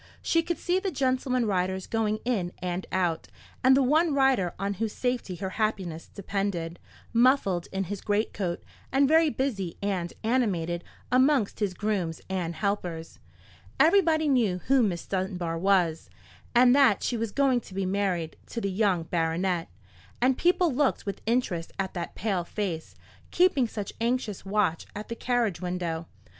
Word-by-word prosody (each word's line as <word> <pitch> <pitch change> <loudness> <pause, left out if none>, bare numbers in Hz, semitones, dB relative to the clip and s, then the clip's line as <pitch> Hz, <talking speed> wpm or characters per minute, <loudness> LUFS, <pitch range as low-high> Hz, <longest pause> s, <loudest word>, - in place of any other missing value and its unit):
She 330 - +3
could 340 +1 -3
see 360 +1 +1
the 385 - -2
gentleman 255 -4 0
riders 190 -2 -1
going 215 -1 0
in 195 -8 -1
and 180 0 -4
out, 175 -3 0 0.4
and 260 +1 +6
the 275 - +4
one 305 +3 +3
rider 265 -10 +2
on 200 +2 -1
whose 220 -2 -1
safety 245 -7 -2
her 190 +1 -4
happiness 185 -7 -2
depended, 195 -4 -3 0.3
muffled 230 -8 +3
in 195 0 -1
his 195 +1 -5
greatcoat, 205 -4 -1 0.3
and 275 +1 +4
very 320 +2 +5
busy 225 - -2
and 190 -4 -2
animated 185 -8 0 0.3
amongst 260 -3 +3
his 200 -4 -1
grooms 190 -7 -1
and 175 -3 -2
helpers. 180 -5 -3 0.6
Everybody 320 -3 +4
knew 235 -10 +2
who 270 -1 +4
Miss 185 -7 -1
Dunbar 185 -3 -2
was, 175 -4 +2 0.5
and 245 +1 +6
that 270 -8 +4
she 245 - 0
was 225 -2 -2
going 265 -2 +2
to 190 - -13
be 195 0 -1
married 185 -4 -1
to 235 - -4
the 200 -3 -2
young 190 -4 +1
baronet; 165 +1 -1 0.5
and 255 +2 +3
people 350 0 +2
looked 285 +1 +1
with 200 - -4
interest 215 -9 0
at 190 -1 -2
that 175 -2 -5
pale 195 -4 -1
face, 170 -3 -4 0.3
keeping 350 -9 +3
such 210 -3 -5
anxious 235 -4 -1
watch 195 -4 0
at 210 +1 -6
the 230 - -3
carriage 235 -7 0
window. 175 -2 -3
205 Hz, 155 wpm, -27 LUFS, 180-255 Hz, 0.6 s, and